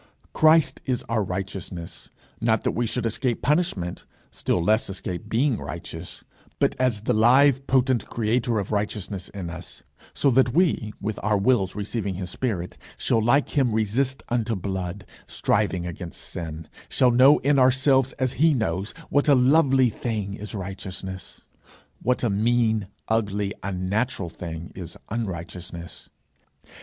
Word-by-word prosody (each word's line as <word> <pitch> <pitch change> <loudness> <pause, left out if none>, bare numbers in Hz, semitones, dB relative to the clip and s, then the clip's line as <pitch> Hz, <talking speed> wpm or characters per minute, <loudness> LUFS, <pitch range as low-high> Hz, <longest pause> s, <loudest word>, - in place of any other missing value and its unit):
Christ 155 0 +4
is 125 -2 0
our 115 -2 +1
righteousness, 90 -2 -6 0.3
not 110 -2 +2
that - - +1
we 120 0 -1
should 120 +1 -2
escape 115 +2 -1
punishment, 130 - 0 0.3
still - - 0
less 110 +5 +2
escape 95 +2 -5
being 125 +2 +2
righteous, 85 0 -7 0.3
but - - +2
as 125 -5 +1
the - - 0
live 135 +4 +5
potent 130 -2 +2
creator 115 +1 0
of 100 -2 -2
righteousness 100 -2 -2
in 95 -4 -6
us, 90 0 -8 0.3
so 140 - +3
that 130 0 +3
we, 160 -11 +2
with 105 0 -3
our 105 0 +2
wills 100 -3 +2
receiving 105 -1 -3
his 90 -1 -5
spirit, 95 -9 -3 0.2
shall 115 - +1
like 135 +5 +3
him 130 -6 +1
resist 125 +5 0
unto 115 -1 0
blood, 95 0 -4 0.2
striving 100 -4 0
against 85 0 -6
sin; 80 -1 -6 0.2
shall 125 -2 +3
know 130 +4 +7
in 140 0 +2
ourselves, 130 0 +4
as 130 -1 -1
he 155 0 +3
knows, 100 -4 -2 0.2
what 145 +1 +3
a 140 - +7
lovely 130 -1 +4
thing 105 -4 -3
is 105 +2 -7
righteousness, 95 -1 -7 0.6
what 125 +2 0
a 120 - +2
mean, 110 0 +2 0.2
ugly, 105 -2 0
unnatural 95 +2 -1
thing 85 0 -7
is 85 -2 -7
unrighteousness. 85 -5 -6
110 Hz, 145 wpm, -25 LUFS, 95-125 Hz, 0.6 s, know